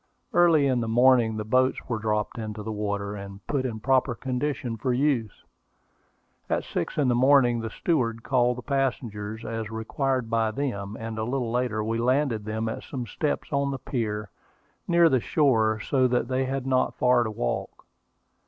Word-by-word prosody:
Early 165 -4 +5
in 130 -3 +2
the 115 - -2
morning 120 -1 +4
the 105 - -3
boats 130 +4 +1
were 115 -3 -2
dropped 105 +1 -1
into 110 -1 -5
the 110 - -4
water, 100 -1 -3
and 100 0 -9
put 135 -3 -1
in 110 -3 -5
proper 130 0 +2
condition 130 0 -2
for 125 +4 -1
use. 125 -5 0 1.1
At - - 0
six - - -4
in 145 -3 +2
the 125 - +3
morning 125 -1 +4
the 115 0 -4
steward 115 -7 -1
called 125 -2 +2
the 125 - -7
passengers, 115 -6 -2
as 115 -1 -4
required 125 +3 -1
by 115 -1 +1
them, 110 -5 -3
and 115 -1 -5
a - - -1
little 120 0 -2
later 120 -3 0
we 115 +1 -1
landed 125 -3 +1
them 110 +1 -2
at 110 - -4
some 125 -4 -5
steps 145 +7 -3
on 140 0 +1
the 135 - -3
pier, 105 -6 -3 0.6
near 170 -1 +5
the 130 -5 +3
shore, 110 -6 +2
so 130 +3 +2
that 120 -1 0
they 130 0 0
had 135 0 -3
not 130 -1 +1
far 125 -1 +3
to 110 - -3
walk. 80 - -4
120 Hz, 180 wpm, -26 LUFS, 110-130 Hz, 1.1 s, Early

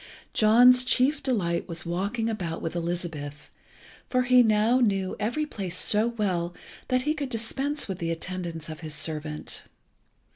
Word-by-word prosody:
John's 245 +4 +6
chief 260 +4 +2
delight 185 -10 -1
was 170 +1 -5
walking 200 +7 -2
about 180 -7 -3
with 165 - -4
Elizabeth, 165 -4 -4 0.6
for 255 0 +2
he 250 0 +6
now 220 +2 +3
knew 195 -6 +1
every 240 +9 -1
place 190 - -5
so 215 +4 +3
well 185 -7 -1 0.3
that 255 0 +1
he 300 +2 +1
could 290 -4 -4
dispense 270 +5 -1
with 190 -2 -5
the 165 -2 -2
attendance 165 -1 -4
of 155 -1 -7
his 155 -2 -5
servant. 150 0 -2
200 Hz, 150 wpm, -26 LUFS, 170-245 Hz, 0.6 s, John's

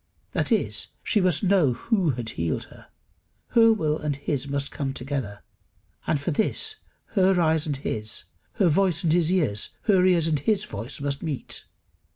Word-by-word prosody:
That - - -1
is, - - +1 0.2
she 210 - +2
must 185 +2 +2
know 180 -9 +4
who 190 - 0
had 115 -2 -4
healed 85 -5 -2
her. - - -16 0.6
Her 230 -2 +6
will 155 -8 0
and 150 -2 -2
his 140 -1 -3
must 140 0 -2
come 135 -2 -3
together; 125 -6 -4 0.6
and 150 - +1
for 145 +5 -2
this 435 - 0 0.3
her 190 -2 +3
eyes 160 -2 +2
and 145 -2 -1
his, 110 -5 -3 0.3
her 190 - +2
voice 180 +1 +2
and 160 -2 +2
his 170 -1 +3
ears, 140 - 0
her 190 -4 +4
ears 175 -3 +4
and 155 -3 +1
his 215 +3 +1
voice 110 +4 -7
must 140 0 -2
meet. 150 -5 -5
155 Hz, 175 wpm, -25 LUFS, 140-185 Hz, 0.6 s, Her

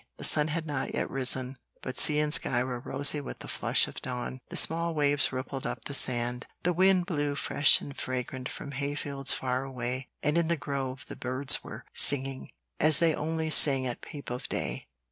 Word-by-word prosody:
The - - -10
sun 150 0 +3
had 160 +1 -3
not 145 -3 -4
yet - - -3
risen, 130 0 -2 0.2
but 130 - -5
sea 150 - +3
and 150 0 0
sky 120 - 0
were 125 -1 -5
rosy 145 +4 +3
with - - -8
the - - -11
flush - - +2
of - - -9
dawn; 125 0 -5
the - - -8
small 165 0 +3
waves 145 -1 +2
rippled 130 +1 -5
up - - -6
the 140 - -5
sand, 125 -2 0 0.2
the 180 - +1
wind 185 0 +3
blew 145 -4 -2
fresh 140 0 +3
and 140 - -9
fragrant 130 0 -5
from 140 - -8
hayfields 140 0 0
far 130 0 -2
away, 130 0 -5
and 150 +3 +2
in 170 - 0
the 170 0 0
grove 135 -2 -5
the - - -7
birds 130 +2 +2
were - - -10
singing, 135 -1 +2 0.3
as 155 -1 +6
they 165 0 +2
only 160 +1 -3
sing 135 -4 +7
at 125 -2 -4
peep 145 -4 -9
of 125 +2 -5
day. - - -4
140 Hz, 200 wpm, -28 LUFS, 130-150 Hz, 0.3 s, sing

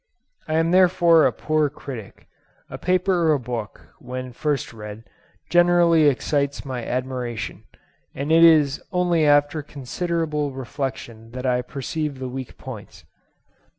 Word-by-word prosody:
I 155 - -1
am 165 +1 +2
therefore 175 -3 +5
a - - 0
poor 155 -1 0
critic: 130 -7 -9 0.5
a - - -7
paper 180 -2 +2
or 150 - +3
book, 115 -5 -6
when 125 0 -6
first 145 -1 -2
read, 105 0 -9 0.5
generally 175 -2 +5
excites 140 +1 0
my 130 -3 -4
admiration, 125 -3 -4 0.5
and 145 +3 -3
it 165 +1 +6
is 155 -4 +5
only 175 -3 +2
after 145 +1 +3
considerable 150 +1 -3
reflection 125 -3 -6
that 130 +1 -5
I 125 -1 +2
perceive 145 +3 -4
the 130 -1 -5
weak 130 0 -7
points. 100 -9 -10
145 Hz, 130 wpm, -23 LUFS, 125-160 Hz, 0.5 s, it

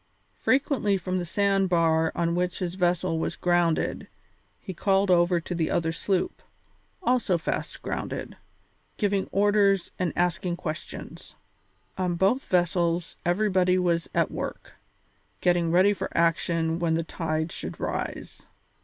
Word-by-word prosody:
Frequently 260 -7 +2
from 185 0 -2
the 175 - -3
sand 195 +1 +1
bar 165 -2 +3
on 170 0 0
which 180 0 -1
his 175 -2 -3
vessel 180 -2 0
was - - -2
grounded 175 -2 +1 0.5
he 190 - -7
called 195 +2 +2
over 175 0 +4
to 170 - -5
his 165 -2 0
other 165 -1 0
sloop, 180 +3 -1 0.6
also 245 - +2
fast 165 - -4
grounded, - - -4 0.6
giving 200 -2 0
orders 200 -2 +3
and 180 -3 0
asking 175 0 0
questions. 155 -3 -7 0.6
On 180 -2 0
both 195 +9 +2
vessels 175 -1 +1
everybody 185 0 +2
was 170 -2 0
at - - +2
work, - - -6 0.7
getting 175 -2 +2
ready 185 +4 +4
for - - -4
action 165 0 +1
when 165 -2 +1
the 165 - 0
tide 160 -1 -2
should - - -7
rise. - - -5
175 Hz, 135 wpm, -26 LUFS, 170-190 Hz, 0.7 s, over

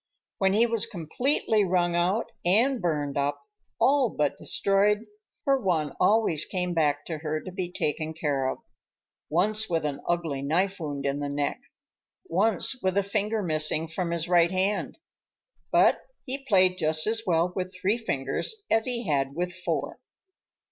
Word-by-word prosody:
When 190 -2 +3
he 225 +3 +4
was 230 -1 +1
completely 220 - 0
wrung 175 -2 +1
out 185 +6 0
and 235 +8 +3
burned 145 -5 -1
up,—all 275 - 0
but 150 -6 -1
destroyed,—her 215 - 0
Juan 160 -7 0
always 195 -6 +3
came 180 -1 -2
back 145 -3 +1
to 160 -3 -5
her 155 0 -2
to 185 - -9
be 180 -1 -4
taken 160 -3 -2
care 145 -4 -1
of,—once 210 +11 -2
with 165 -3 0
an 145 -1 -3
ugly 165 -6 -1
knife 185 +8 0
wound 145 -3 -4
in 140 +1 -1
the 145 0 -3
neck, 145 0 -2 0.6
once 215 +7 +2
with 190 0 0
a 200 - +3
finger 210 +2 -1
missing 155 -1 +1
from 170 +2 -3
his 170 -1 -1
right 170 -1 +4
hand,—but 195 - -1 0.3
he 270 +1 -4
played 185 -4 +4
just 155 0 0
as 225 +1 0
well 175 +1 +2
with 185 -1 -3
three 200 +4 0
fingers 220 - -2
as 225 0 +3
he 245 -2 -3
had 140 -4 0
with 180 +1 -2
four. 185 0 -3
180 Hz, 150 wpm, -26 LUFS, 155-215 Hz, 0.6 s, he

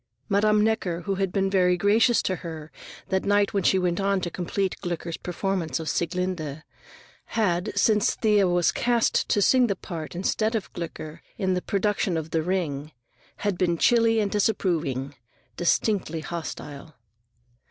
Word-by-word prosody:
Madame 210 +1 +3
Necker, 195 -6 0
who 195 +4 -2
had 195 -2 0
been 195 0 +1
very 180 -2 +3
gracious 220 +5 +3
to 185 - -1
her 160 -3 -8 0.4
that 190 0 +1
night 205 0 +2
when 200 - +1
she 190 - +3
went 180 -1 0
on 200 0 +1
to 175 -1 -4
complete 190 +2 -2
Gloeckler's 170 -1 -4
performance 180 -2 -2
of 160 - -6
Sieglinde, 170 -4 -2 0.6
had, 200 -3 0
since 210 -2 +3
Thea 210 -3 +3
was 175 -1 +2
cast 240 -1 +1
to 205 - +3
sing 255 +4 +4
the 200 - 0
part 165 -3 -7
instead 215 +5 0
of 215 - -4
Gloeckler 160 -2 -7 0.2
in 190 -2 0
the 180 - -1
production 200 -3 0
of 160 0 -5
the 165 - +1
"Ring," 155 -4 -2 0.7
been 170 -2 +1
chilly 230 +2 +4
and 205 -2 0
disapproving, 165 - 0 0.4
distinctly 175 -2 0
hostile. 155 -2 -7
185 Hz, 155 wpm, -25 LUFS, 170-205 Hz, 0.7 s, sing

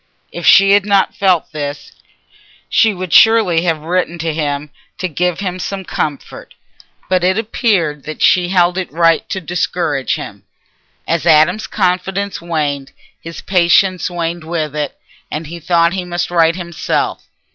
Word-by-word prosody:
If - - -4
she 195 0 +7
had 200 0 +5
not 200 -1 +1
felt 185 -4 +1
this, 145 -2 -6 0.8
she 225 - +3
would 185 -3 -5
surely 220 -7 +5
have 165 -3 0
written 175 +1 -1
to 165 -1 -2
him 145 -1 -3 0.3
to 185 - -2
give 180 +2 -2
him 185 -2 -3
some 195 0 -5
comfort; 145 -4 -5 0.5
but 185 -1 +1
it 185 +2 +2
appeared 200 - 0
that 155 - -7
she 180 -1 +4
held 180 0 +2
it 185 - -5
right 165 +1 +2
to 190 - -3
discourage 165 -4 -1
him. - - -8 0.7
As 170 +1 -1
Adam's 165 +6 +4
confidence 195 0 -1
waned, 145 -5 -3 0.3
his 165 0 -8
patience 185 0 +2
waned 170 -1 -4
with 155 -2 -3
it, 150 -2 -3 0.3
and 155 +2 -5
he 170 +3 -8
thought 170 +1 +2
he 190 -1 -3
must 175 0 -3
write 165 -1 +3
himself. 170 -3 -3
175 Hz, 155 wpm, -16 LUFS, 160-185 Hz, 0.8 s, she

